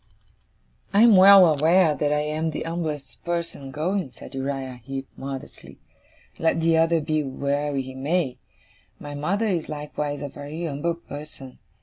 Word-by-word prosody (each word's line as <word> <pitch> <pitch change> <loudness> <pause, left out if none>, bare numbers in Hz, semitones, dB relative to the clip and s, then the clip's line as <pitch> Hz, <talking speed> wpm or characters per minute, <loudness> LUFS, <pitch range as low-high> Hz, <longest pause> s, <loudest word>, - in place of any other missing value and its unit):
'I 205 - +6
am 235 -3 +7
well 190 0 +9
aware 160 +2 +4
that 145 0 -1
I 150 0 +2
am 155 +2 -1
the 155 - -4
umblest 155 -6 -5
person 170 -5 -4
going,' 155 +2 -2
said 120 - -12
Uriah 135 -2 -4
Heep, 135 +1 -5
modestly; 135 -1 -8 0.6
'let 165 0 +2
the 165 0 +3
other 165 +1 +3
be 155 0 0
where 140 +2 -2
he 130 -1 -3
may. 135 -1 -1 0.6
My 145 0 -8
mother 180 +10 -1
is 180 -7 -1
likewise 150 -1 -4
a - - -3
very 145 +4 -6
umble 160 +3 -2
person. 145 -5 -10
150 Hz, 150 wpm, -24 LUFS, 140-165 Hz, 0.6 s, well